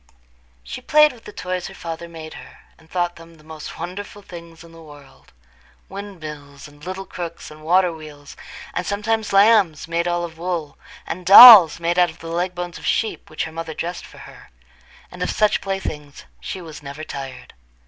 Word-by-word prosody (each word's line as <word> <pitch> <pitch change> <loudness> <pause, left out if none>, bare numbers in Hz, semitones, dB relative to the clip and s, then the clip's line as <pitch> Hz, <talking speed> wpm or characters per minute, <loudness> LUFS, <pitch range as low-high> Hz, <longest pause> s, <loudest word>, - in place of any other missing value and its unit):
She - - -8
played 300 -1 +4
with 235 - -18
the - - -9
toys 180 -2 -5
her - - -12
father 170 0 -7
made 160 -1 -10
her, - - -13 0.2
and 160 0 -22
thought 175 -1 -2
them 165 0 -15
the 155 - -21
most 155 -1 -10
wonderful 205 +3 -8
things 170 -2 -12
in 170 - -16
the 165 0 -15
world—windmills, 145 - -13
and 145 0 -19
little 185 +2 -6
crooks, 170 -4 -8
and 155 0 -14
water 175 +2 +2
wheels, 150 -2 -12 0.4
and 180 - -2
sometimes 215 +3 -2
lambs 195 -6 +4
made 170 +1 -1
all 175 0 -1
of 165 -1 -8
wool, 170 -4 -4 0.3
and 180 +2 -6
dolls 200 -3 +10
made 170 +1 0
out 175 -1 +4
of 160 - -13
the 165 - -10
leg 175 +2 -2
bones 175 0 -6
of - - -11
sheep, 225 - -2
which 155 - -4
her 160 - -6
mother 160 -1 -7
dressed 175 +1 -5
for - - -17
her; - - -15 0.6
and - - -11
of - - -1
such 215 -1 +1
playthings 155 -7 -6
she 190 - -7
was 155 -3 -11
never 145 +2 -9
tired. 135 -4 -9
170 Hz, 190 wpm, -21 LUFS, 155-185 Hz, 0.6 s, dolls